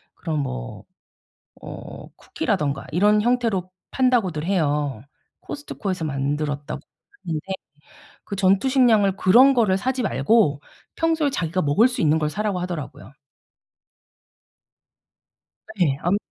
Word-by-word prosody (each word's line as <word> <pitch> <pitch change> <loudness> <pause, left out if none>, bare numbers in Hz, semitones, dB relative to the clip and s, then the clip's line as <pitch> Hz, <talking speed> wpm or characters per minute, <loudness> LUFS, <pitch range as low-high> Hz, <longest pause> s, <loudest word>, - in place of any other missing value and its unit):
그런 160 -3 -3
뭐 - - -5 0.8
어 - - -9
"쿠키라든가 140 -2 -2
이런 210 +5 +3
형태로 230 -7 0 0.2
판다."고들 230 - +1
해요. 150 - 0 0.4
코스트코에서 195 - -5
만들었다고 145 0 -3 0.4
하는데 160 -2 -4 0.8
그 200 - -6
전투식량을 205 +1 +3
그런 250 +9 +6
거를 215 -6 +3
사지 255 +5 -1
말고 145 - +2 0.4
"평소에 320 -3 +1
자기가 180 - -1
먹을 150 - +4
수 250 - -4
있는 155 0 +3
걸 150 -1 0
사라."고 200 +3 -2
하더라고요. 170 -7 -6 2.7
예. 160 -8 +2
안 180 +4 +2
185 Hz, 260 characters per minute, -23 LUFS, 150-225 Hz, 2.7 s, 그런